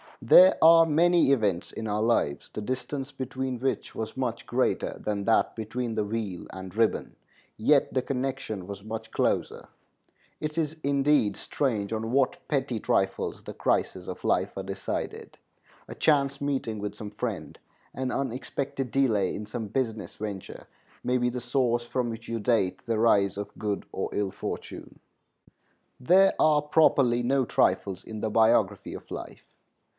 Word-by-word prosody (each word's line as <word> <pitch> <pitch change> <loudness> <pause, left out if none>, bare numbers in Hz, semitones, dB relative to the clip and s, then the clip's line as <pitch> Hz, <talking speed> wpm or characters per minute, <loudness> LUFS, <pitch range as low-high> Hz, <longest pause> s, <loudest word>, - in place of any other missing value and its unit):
There 185 +1 +8
are 165 0 +8
many 170 0 +4
events 105 -8 +1
in 110 - -5
our 105 0 -1
lives, 110 -11 +1
the - - -4
distance 130 +4 -4
between 130 -1 -4
which 135 +2 -2
was 110 +2 -5
much 125 -3 -2
greater - - 0
than 100 -2 -2
that 115 - +2
between 115 +2 -3
the 110 - 0
wheel 105 -3 -4
and 95 0 -8
ribbon, 115 0 +1 0.4
yet - - +3
the 130 - +2
connection 130 -8 -3
was 100 -1 -7
much 110 +1 -6
closer. - - -1 0.7
It 150 +1 -4
is, 160 -1 -1
indeed, 140 -6 +2
strange 110 -6 -2
on 110 +1 -3
what 135 0 +2
petty 135 -5 -1
trifles 95 -1 -1
the - - -7
crises - - -1
of - - -7
life - - 0
are - - -3
decided. - - -5 0.5
A - - -7
chance 140 -2 +2
meeting 135 -6 -2
with 105 0 -4
some 105 -1 -7
friend, 110 -1 -5 0.4
an 130 -1 -2
unexpected 135 +1 -3
delay 110 -9 +2
in 105 - -5
some 110 +1 -5
business 110 -1 -3
venture, 100 -3 -7 0.4
may 125 +1 +1
be 125 0 +1
the 125 0 -4
source 120 -1 +1
from 120 0 -2
which 115 0 -7
you 115 0 -2
date 105 -4 +1
the 115 -1 0
rise 100 -4 +3
of 100 - -6
good 105 -2 -2
or - - -3
ill 100 -2 -1
fortune. - - -7 1.0
There 185 +9 +5
are 150 -1 +4
properly 140 -5 +3
no 130 +2 +2
trifles 95 -2 +1
in 110 -1 -7
the 110 - -1
biography 110 +1 +2
of - - -11
life. - - -7
120 Hz, 160 wpm, -27 LUFS, 105-135 Hz, 1.0 s, There